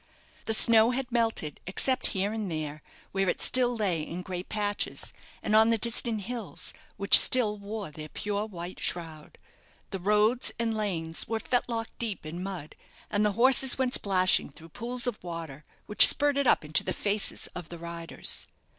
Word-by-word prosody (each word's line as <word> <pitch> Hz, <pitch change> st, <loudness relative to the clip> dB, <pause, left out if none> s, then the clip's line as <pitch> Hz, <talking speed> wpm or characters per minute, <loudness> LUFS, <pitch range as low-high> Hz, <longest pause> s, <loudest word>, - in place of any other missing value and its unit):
The 220 Hz, -, +3 dB
snow 225 Hz, 0 st, +6 dB
had 250 Hz, 0 st, -4 dB
melted, 225 Hz, -, -2 dB
except 255 Hz, +7 st, 0 dB
here 200 Hz, +2 st, -2 dB
and 215 Hz, -3 st, -4 dB
there, 155 Hz, -1 st, -5 dB, 0.3 s
where 195 Hz, -1 st, -1 dB
it -, -, -2 dB
still 245 Hz, -1 st, +6 dB
lay 185 Hz, -7 st, -1 dB
in 170 Hz, +4 st, -7 dB
great 180 Hz, 0 st, -7 dB
patches; 205 Hz, -1 st, -3 dB, 0.3 s
and 215 Hz, -, 0 dB
on 220 Hz, +1 st, +5 dB
the 230 Hz, -, +2 dB
distant 230 Hz, -1 st, +1 dB
hills, 230 Hz, -2 st, -6 dB, 0.2 s
which 200 Hz, 0 st, +6 dB
still 215 Hz, -5 st, +3 dB
wore 200 Hz, -3 st, -7 dB
their 155 Hz, +1 st, -10 dB
pure 205 Hz, +4 st, -4 dB
white 180 Hz, -3 st, -9 dB
shroud. 160 Hz, -3 st, -5 dB, 0.5 s
The 195 Hz, -, -4 dB
roads 210 Hz, +6 st, +1 dB
and 230 Hz, -1 st, -2 dB
lanes 170 Hz, -7 st, -3 dB
were 225 Hz, 0 st, -3 dB
fetlock 235 Hz, -1 st, -2 dB
deep 220 Hz, -8 st, -4 dB
in 165 Hz, +3 st, -7 dB
mud, 185 Hz, -5 st, -7 dB, 0.4 s
and 205 Hz, 0 st, 0 dB
the 210 Hz, -1 st, +1 dB
horses 260 Hz, +3 st, +4 dB
went 260 Hz, -1 st, -1 dB
splashing 185 Hz, -2 st, +2 dB
through 160 Hz, +4 st, -16 dB
pools 240 Hz, +8 st, -4 dB
of 240 Hz, -6 st, -4 dB
water, 165 Hz, -5 st, -8 dB, 0.2 s
which 210 Hz, -, +9 dB
spurted 285 Hz, -2 st, +3 dB
up 155 Hz, -, +2 dB
into 150 Hz, +1 st, 0 dB
the -, -, -3 dB
faces 205 Hz, 0 st, -3 dB
of 175 Hz, -3 st, -8 dB
the 170 Hz, -, -9 dB
riders. 170 Hz, 0 st, -3 dB
205 Hz, 170 wpm, -27 LUFS, 175-230 Hz, 0.5 s, which